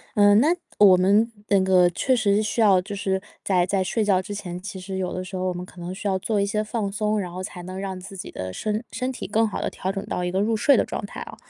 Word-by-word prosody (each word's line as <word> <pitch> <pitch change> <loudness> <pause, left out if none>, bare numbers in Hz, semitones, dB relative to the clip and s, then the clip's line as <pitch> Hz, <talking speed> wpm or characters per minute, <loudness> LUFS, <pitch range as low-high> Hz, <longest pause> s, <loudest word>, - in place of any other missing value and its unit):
呃， 205 0 +6
那 305 +10 +4 0.2
我 195 -3 +8
们 205 +5 +3 0.2
那 200 -1 +5
个 185 -2 +4
确 255 +9 +1
实 205 -4 +2
是 215 - +1
需 220 +2 -1
要 195 -4 +6
就 205 +2 -7
是 190 -1 -1 0.2
在 180 -3 +2
在 190 0 0
睡 215 +4 0
觉 190 -3 +3
之 205 +2 -7
前， 180 -3 -6
其 190 -1 -7
实 190 +1 -5
有 185 -1 -2
的 185 - -3
时 190 0 -8
候 185 - -2
我 - - -2
们 180 +1 -6
可 180 - -15
能 175 +2 -5
需 200 - -5
要 190 -1 +1
做 210 +1 0
一 200 - +2
些 215 +1 -1
放 210 -2 -3
松， 210 +1 0
然 180 -3 -4
后 185 - -5
才 180 -1 -7
能 185 +1 -7
让 190 -1 -4
自 195 +2 -10
己 180 - -7
的 95 0 -6
身 215 - -2
身 255 +1 -2
体 - - -6
更 220 +1 +2
好 210 - -4
地 - - -1
调 190 - -3
整 195 0 -4
到 180 - -3
一 180 - -1
个 190 - 0
入 220 +2 +1
睡 280 +6 +4
的 - - +2
状 - - -5
态 - - -9
啊。 - - -8
195 Hz, 320 characters per minute, -24 LUFS, 185-210 Hz, 0.2 s, 我